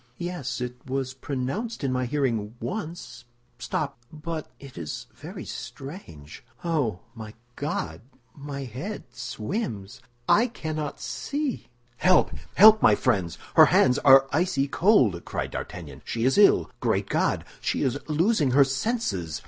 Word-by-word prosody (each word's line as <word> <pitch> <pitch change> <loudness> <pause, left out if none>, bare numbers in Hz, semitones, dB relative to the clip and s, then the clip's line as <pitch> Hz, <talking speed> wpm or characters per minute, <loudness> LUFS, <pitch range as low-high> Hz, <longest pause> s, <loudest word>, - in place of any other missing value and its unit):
"Yes, 175 -8 -4
it 125 0 -4
was 130 0 -2
pronounced 140 - -4
in 135 - 0
my 130 0 0
hearing 120 -6 -1
once. 155 - -6 0.3
Stop—but—it 145 +1 -6
is 80 -3 -6
very - - -9
strange—oh, 130 - -5
my 110 -2 -9 0.2
God, 80 - -3 0.3
my 140 -1 -6
head 135 - -6
swims! 120 - -5 0.3
I 230 +4 +5
cannot 155 - -5
see!" 285 -3 -3 0.3
"Help, 185 +7 +4 0.2
help, 215 +2 +8
my 105 - +6
friends! 95 -11 0 0.2
her - - +9
hands 125 -1 +4
are 135 -1 +7
icy 145 -4 +1
cold," 135 - +3
cried - - -4
D'Artagnan. - - -7
"She 115 0 -2
is 135 - +3
ill! 205 -9 +5
Great 105 -5 0
God, - - 0
she - - -1
is 130 +2 0
losing 160 - +2
her 140 - +9
senses!" 130 - -2
135 Hz, 125 wpm, -26 LUFS, 120-170 Hz, 0.3 s, her